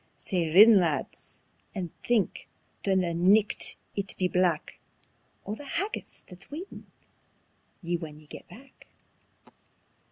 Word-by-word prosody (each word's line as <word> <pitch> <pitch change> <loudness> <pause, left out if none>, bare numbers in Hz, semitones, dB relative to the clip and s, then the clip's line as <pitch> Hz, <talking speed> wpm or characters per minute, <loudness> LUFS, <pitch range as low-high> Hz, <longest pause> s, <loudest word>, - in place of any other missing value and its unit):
Sae 170 -4 -2
rin, 210 +4 +9
lads, 160 -6 -3 0.4
and 180 -4 -4
think, 235 -5 0 0.3
though 195 -1 +2
the 180 -2 +1
nicht 195 +5 +3 0.2
it 200 -1 -3
be 185 - +1
black, 180 -3 0 0.7
O' 205 - -4
the 255 - -8
haggis 340 - -4
that's 180 +2 -13
waitin' 335 +7 -9 0.9
ye 175 -1 -1
when 155 -2 -8
ye 155 - -18
get - - -11
back." 260 +8 -16
190 Hz, 125 wpm, -28 LUFS, 170-220 Hz, 0.9 s, rin